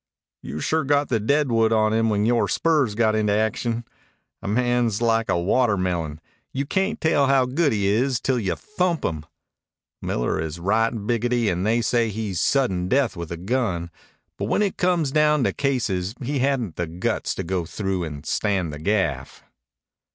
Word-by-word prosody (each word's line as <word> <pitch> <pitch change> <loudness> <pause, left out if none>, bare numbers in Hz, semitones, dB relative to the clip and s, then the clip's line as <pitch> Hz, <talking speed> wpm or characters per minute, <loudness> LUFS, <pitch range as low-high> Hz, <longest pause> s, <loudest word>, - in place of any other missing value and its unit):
"You 75 - -6
sure 160 - +1
got 145 0 +1
the 115 - +1
deadwood 115 -2 +2
on 110 -1 +3
him 115 0 +2
when 105 0 +1
yore 120 0 +2
spurs 150 -10 +1
got 110 -1 +2
into 105 -1 +1
action. 115 +2 -1 0.6
A - - -6
man's 120 -1 +1
like 115 -1 +1
a 85 - +2
watermelon. 90 -7 0 0.3
You 140 +2 -2
cayn't 195 +8 -1
tell 145 -4 +2
how 135 -1 +4
good 145 +4 +1
he 105 -3 0
is 120 +5 +1
till 130 0 0
you 95 -5 -1
thump 180 -5 -1
him. 75 -2 -3 0.7
Miller - - -1
is 80 +1 -5
right 110 +6 +2
biggity, 115 +1 0
and 90 +3 -1
they 115 +2 +2
say 115 0 +1
he's 105 -4 -3
sudden 95 -10 +1
death 130 0 +1
with 85 -2 -6
a 85 - -4
gun. 95 -4 -2 0.5
But - - -1
when - - +1
it 200 - -1
come 180 -2 +2
down 150 0 +2
to - - +1
cases 110 -8 -1
he 140 +2 -2
hadn't 125 - 0
the 85 - -2
guts 85 +3 -2
to - - -3
go 90 -1 -2
through 95 0 -2
and 75 -2 -7
stand 95 -6 -1
the 75 - -7
gaff." 80 -7 -1
110 Hz, 180 wpm, -23 LUFS, 95-130 Hz, 0.7 s, how